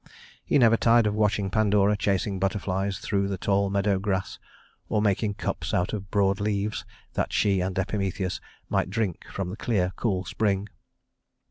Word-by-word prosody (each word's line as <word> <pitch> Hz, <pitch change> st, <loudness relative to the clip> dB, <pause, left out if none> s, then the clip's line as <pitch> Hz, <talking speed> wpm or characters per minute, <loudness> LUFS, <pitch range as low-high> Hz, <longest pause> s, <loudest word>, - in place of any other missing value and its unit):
He -, -, +2 dB
never 115 Hz, -3 st, +5 dB
tired 115 Hz, 0 st, +4 dB
of 105 Hz, -, +1 dB
watching 105 Hz, -2 st, +1 dB
Pandora 105 Hz, -1 st, +3 dB
chasing 100 Hz, -1 st, 0 dB
butterflies 95 Hz, 0 st, -1 dB
through 100 Hz, -1 st, -1 dB
the 100 Hz, -1 st, -2 dB
tall 100 Hz, +1 st, +1 dB
meadow 100 Hz, 0 st, +1 dB
grass, 95 Hz, -2 st, -2 dB, 0.5 s
or 105 Hz, -, +1 dB
making 105 Hz, 0 st, +1 dB
cups -, -, -3 dB
out 90 Hz, +4 st, 0 dB
of 100 Hz, -3 st, -5 dB
broad 100 Hz, 0 st, +2 dB
leaves, 105 Hz, 0 st, -1 dB, 0.3 s
that -, -, -1 dB
she 100 Hz, -3 st, +2 dB
and 95 Hz, +1 st, -2 dB
Epimetheus 95 Hz, -1 st, -2 dB, 0.3 s
might -, -, 0 dB
drink 100 Hz, -4 st, -2 dB
from 95 Hz, -2 st, -3 dB
the 100 Hz, -, -7 dB
clear, 95 Hz, -7 st, 0 dB
cool 95 Hz, -5 st, -1 dB
spring. 100 Hz, +1 st, 0 dB
100 Hz, 160 wpm, -26 LUFS, 95-105 Hz, 0.5 s, never